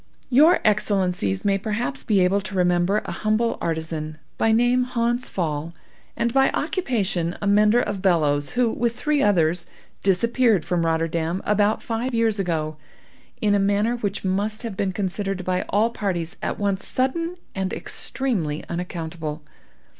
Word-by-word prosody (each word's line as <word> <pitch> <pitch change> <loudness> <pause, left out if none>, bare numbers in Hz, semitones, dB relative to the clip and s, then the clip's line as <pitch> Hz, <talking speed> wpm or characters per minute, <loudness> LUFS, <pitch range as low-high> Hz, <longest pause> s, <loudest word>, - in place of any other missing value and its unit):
"Your 305 +8 +6
Excellencies 185 - +1
may 195 -1 +2
perhaps 230 +6 -3
be 205 -4 +2
able 190 +3 +3
to 195 0 -7
remember 180 +2 +2
an - - -4
humble 215 +2 0
artizan, 160 -1 -3 0.2
by 225 - +2
name 245 +3 +3
Hans 240 0 -1
Pfaall, 160 -2 -3 0.4
and 235 0 0
by 270 0 +4
occupation 205 - -1
a - - -4
mender 210 +3 +4
of 205 -5 -2
bellows, 150 -6 +2
who, 245 -2 +2
with 235 0 -1
three 300 +2 0
others, 170 -5 +2 0.3
disappeared 220 +1 +2
from 170 -2 0
Rotterdam, 165 +2 0
about 210 +1 +2
five 235 +2 -2
years 225 -2 +1
ago, 155 -4 -1 0.6
in 210 -1 +3
a 205 - +3
manner 205 +4 +2
which 205 -4 -3
must 205 +4 -1
have 225 -4 -5
been 195 -2 -1
considered 195 0 -3
by 185 0 0
all 220 +3 +2
parties 175 -7 -3
at - - -2
once 200 -2 -1
sudden, 330 +7 -1 0.2
and 190 -1 -2
extremely 185 - -2
unaccountable. 165 -3 -5
200 Hz, 150 wpm, -23 LUFS, 175-230 Hz, 0.6 s, Your